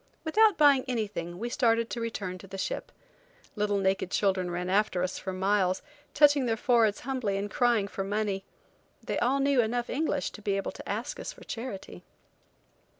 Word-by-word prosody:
Without 420 +4 +4
buying 285 -3 +6
anything 205 -8 -3
we 230 +5 -3
started 230 -1 +2
to 235 - -3
return 195 -5 -4
to 195 - -12
the 195 +1 -7
ship. - - -3 0.6
Little 205 -1 +1
naked 190 -1 +1
children 190 -2 +1
ran 175 +1 -3
after 190 -1 +1
us 185 - -2
for 190 - -4
miles, 190 0 +1 0.3
touching 290 -3 +5
their 225 -1 +1
foreheads 225 -3 +3
humbly 245 -6 -1
and 200 +1 -3
crying 235 -5 +2
for 195 - -4
money. 200 -1 -1 0.6
They - - -2
all 265 +3 +2
knew 275 -2 +3
enough 240 +2 -1
English 290 0 -1
to 210 - -11
be 200 -1 0
able 195 - -2
to - - -10
ask - - -3
us - - -5
for - - -15
charity. 210 - -7
210 Hz, 180 wpm, -29 LUFS, 195-245 Hz, 0.6 s, buying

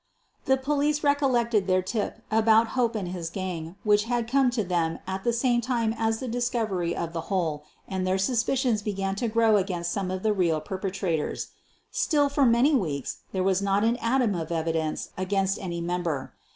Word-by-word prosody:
The 265 0 +3
police 295 +2 0
recollected 245 -8 +2
their 185 0 +2
tip 205 +3 -3
about 225 +1 +4
Hope 240 -3 0
and 195 -5 -3
his 175 -2 -4
gang 175 -2 -5
which 210 0 +3
had 240 -1 -1
come 265 +1 +3
to 240 -3 -1
them 170 -3 0
at 190 0 -4
the 240 - +2
same 240 0 +2
time 235 -2 0
as 225 -1 0
the 260 - -5
discovery 225 -7 -1
of 170 0 -4
the 165 - -2
hole 160 -6 -1 0.2
and 190 -1 -3
their 185 +1 +2
suspicions 235 +2 +1
began 195 -2 -2
to 235 - 0
grow 225 -1 +4
against 180 -3 -1
some 195 -2 -2
of 185 0 -4
the 215 -1 +3
real 170 -5 +1
perpetrator?. 185 -2 -2 0.6
Still, 290 -3 +2
for 280 -2 +3
many 240 +6 +4
weeks, 155 - -1
there 190 -1 -1
was 190 0 +2
not 200 +1 +1
an 230 +2 +2
atom 235 -2 +1
of 170 -2 -4
evidence 160 -1 -2
against 195 +1 0
any 170 -3 -4
member. 170 -5 -2
200 Hz, 185 wpm, -26 LUFS, 180-235 Hz, 0.6 s, about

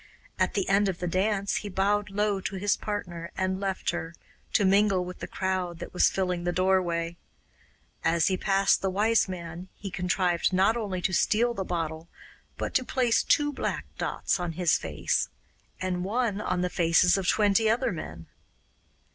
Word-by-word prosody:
At - - +1
the 195 -3 0
end 195 +1 +3
of 185 - -3
the 180 - -4
dance 195 +3 0
he 205 - -5
bowed 200 +2 +1
low 205 -1 0
to 195 - -4
his 200 +2 +1
partner 175 -5 -5
and 185 0 -1
left 195 -1 -1
her, 165 -1 -5 0.4
to 205 - +3
mingle 195 -1 +3
with 180 0 -8
the - - -5
crowd 185 -2 -2
that 165 - -8
was 180 - +4
filling 180 -2 -1
the 175 - 0
doorway. 175 -2 +1 0.9
As 165 0 +2
he 190 - +2
passed 195 +1 +2
the 195 - 0
Wise 210 +2 +2
Man 175 0 -7
he 195 -1 -7
contrived 180 -1 +1
not 195 +5 +3
only 195 -6 -3
to 185 - 0
steal 235 +6 +2
the 195 - -3
bottle 165 -2 -3 0.5
but - - -3
to 260 - +2
place 245 -2 +2
two 290 0 +2
black - - -3
dots - - -1
on 175 -2 -3
his 170 -3 +2
face, 80 - -1 0.5
and 180 -1 -2
one 210 0 -1
on 180 -2 -1
the 180 - 0
faces 170 +1 +4
of 195 -2 -2
twenty 210 +2 +3
other 230 +2 +1
men. 80 - -7
185 Hz, 180 wpm, -27 LUFS, 175-205 Hz, 0.9 s, was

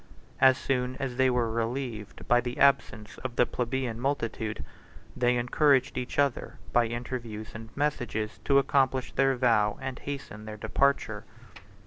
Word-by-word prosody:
As 130 -1 +6
soon 125 -1 -1
as 130 -2 -3
they 130 0 +4
were 120 -2 +1
relieved 115 -2 -4
by 120 0 +4
the 125 +1 -5
absence 110 -6 +2
of 125 -1 -5
the 125 - +4
plebeian 125 -1 -2
multitude, 115 -5 -2 0.5
they 125 0 +2
encouraged 130 +3 +2
each 125 -1 -4
other, 140 -3 0 0.2
by 120 -1 +4
interviews 115 -2 -5
and 115 0 -9
messages, 120 -7 -2
to 140 - +4
accomplish 135 -2 +2
their 135 0 +2
vow, 115 -5 +2
and 130 -1 -5
hasten 135 -7 -7
their 110 0 -7
departure. 140 +6 0
125 Hz, 145 wpm, -28 LUFS, 115-135 Hz, 0.5 s, As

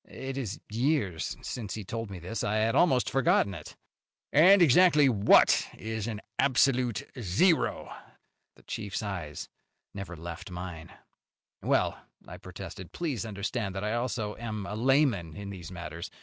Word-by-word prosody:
It 135 0 -6
is 125 -8 -4
years 110 - -1
since 110 -5 -5
he 110 - -5
told 115 +2 -5
me 95 - -7
this. 90 +6 -5
I 105 - 0
had 110 +1 +2
almost 130 -9 +3
forgotten 125 -6 +2
it." 75 -4 -9 0.6
"And 185 +7 +7
exactly 155 -2 +6
what 105 -3 +5
is 110 -1 -4
an 110 -2 -4 0.2
absolute 130 -4 +2 0.2
zero?" 120 - +1 0.6
The - - -21
chief's 100 0 -4
eyes 90 -8 -5 0.5
never 100 -3 -7
left 85 +3 -7
mine. 90 -2 -7 0.7
"Well," - - +1 0.3
I - - -9
protested, 95 -2 -9
"please 140 - -3
understand 100 0 -3
that 95 - -3
I 105 +1 -1
also 120 -3 -2
am 110 -3 -5
a 100 - -5
layman 115 - +2
in 100 +1 -7
these 90 -3 -8
matters. 85 -2 -7
110 Hz, 150 wpm, -29 LUFS, 95-130 Hz, 0.7 s, And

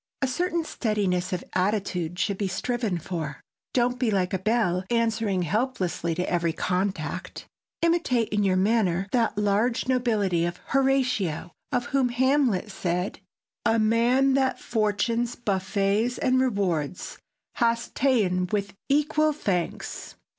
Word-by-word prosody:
A - - +3
certain 340 +5 -1
steadiness 195 - -1
of 180 - -2
attitude 185 -3 -1
should 200 0 -1
be 200 - 0
striven 215 +1 -1
for. 160 -4 -5 0.4
Don't 245 0 +2
be 250 -3 +1
like 190 -2 0
a 190 - 0
bell, 190 -3 +1
answering 225 -5 +1
helplessly 180 - -1
to 180 +2 -2
every 170 -2 0
contact. 185 0 -2 0.4
Imitate 330 -9 +2
in 210 -1 +1
your 190 -2 +2
manner 195 -2 +2
that 230 -4 +1
large 210 +5 +1
nobility 215 -9 +1
of 175 +1 -2
Horatio 255 - +1 0.2
of 245 -1 0
whom 265 -1 +1
Hamlet 250 -5 +2
said, 180 0 -2 0.4
"A 225 - +3
man 235 +5 +3
that 265 -1 +1
fortune's 230 +2 0
buffets 200 +2 0
and 255 0 +2
rewards 185 - -1 0.4
Hast 235 0 +1
ta'en 200 -9 +2
with 200 -2 -1 0.2
equal 300 +2 +2
thanks. 185 - -3
210 Hz, 130 wpm, -26 LUFS, 185-245 Hz, 0.4 s, A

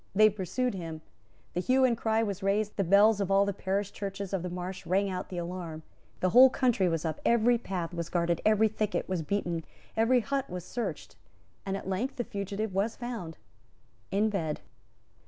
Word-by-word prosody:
They 215 +1 +7
pursued 210 +6 -2
him; 165 -4 -6 0.5
the - - -1
hue 260 +7 +3
and 240 -2 +3
cry 225 0 +1
was 200 -2 -3
raised; 200 +2 0
the 195 - +1
bells 200 +3 +5
of 195 - -1
all 195 +1 +4
the 200 - -1
parish 195 +1 -2
churches 200 -1 -5
of 190 - 0
the 180 - -4
Marsh 180 +2 -5
rang 195 +2 +2
out 185 0 -4
the 180 - -6
alarm; 170 -2 -5 0.4
the 185 - +2
whole 255 +5 +9
country 240 -8 +2
was 165 -1 -1
up; 155 -1 -3
every 235 +1 +4
path 180 -6 -4
was 170 -1 -4
guarded; 170 -1 0
every 215 0 +4
thicket 215 -1 -2
was 185 -3 -1
beaten; 170 -1 -2 0.3
every 240 +3 +4
hut 275 +3 -2
was 180 -1 -6
searched; 240 +4 -5 0.5
and 195 0 -1
at 195 - -8
length 205 +8 -2
the 240 - -2
fugitive 200 0 -4
was 200 +4 0
found 230 -10 -6 0.7
in 210 +2 +1
bed. 160 -7 -2
195 Hz, 190 wpm, -29 LUFS, 180-220 Hz, 0.7 s, whole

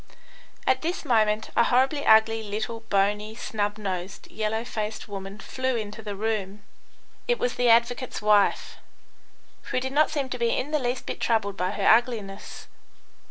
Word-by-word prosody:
At - - +2
this 335 +1 -3
moment 220 -4 +2
a 235 - +5
horribly 265 +4 +2
ugly, 220 0 +5
little, 220 +2 -4
bony, 210 +2 +1
snub 205 -2 -2
nosed, 190 -2 -5
yellow 220 +1 -2
faced 215 -1 -4
woman 195 -1 -7
flew 260 +3 -2
into 215 -1 -5
the 205 -2 -5
room. 205 -1 -3 0.6
It 485 0 +2
was 245 - -1
the 245 -1 +2
advocate's 240 +2 +2
wife, 210 -1 +2 0.9
who - - 0
did 265 +1 -4
not 305 +1 +4
seem 285 -3 -2
to 250 - -4
be 235 -1 +1
in 285 +4 -3
the 305 - +2
least 245 -1 -2
bit - - -5
troubled 220 -4 0
by 180 -1 -1
her 205 - -3
ugliness. 220 -4 +1
220 Hz, 160 wpm, -26 LUFS, 205-245 Hz, 0.9 s, a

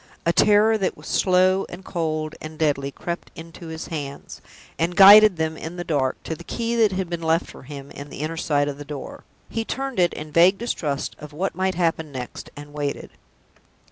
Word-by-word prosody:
A 170 - +3
terror 215 +3 +4
that 190 - -1
was - - -14
slow 185 +1 +3
and 185 +2 -10
cold 155 -3 -2
and 155 0 -8
deadly 145 -3 0
crept 170 +5 -6
into 165 +1 -10
his 160 0 -6
hands, 145 -4 -6 0.4
and 170 +2 0
guided 205 0 +9
them 160 0 -1
in 160 +2 -7
the 175 - -4
dark 145 -6 0
to - - -4
the 170 - -9
key 235 +5 -2
that 220 -3 +4
had 185 -1 -2
been 170 -1 -4
left 165 +1 +1
for - - -12
him 140 +1 -9
in 140 +1 -9
the - - -8
inner 155 +2 -3
side 145 -3 +1
of 145 0 -5
the - - -6
door. 145 -1 -8 0.2
He 225 - -3
turned 270 -1 -4
it 175 -1 +3
in 155 0 -7
vague 175 +5 +5
distrust 155 - -3
of 150 0 -10
what 185 +6 -2
might 190 0 -1
happen 165 -3 0
next, 125 -2 -7
and 145 0 -11
waited. 145 -1 -4
165 Hz, 205 wpm, -23 LUFS, 150-185 Hz, 0.4 s, guided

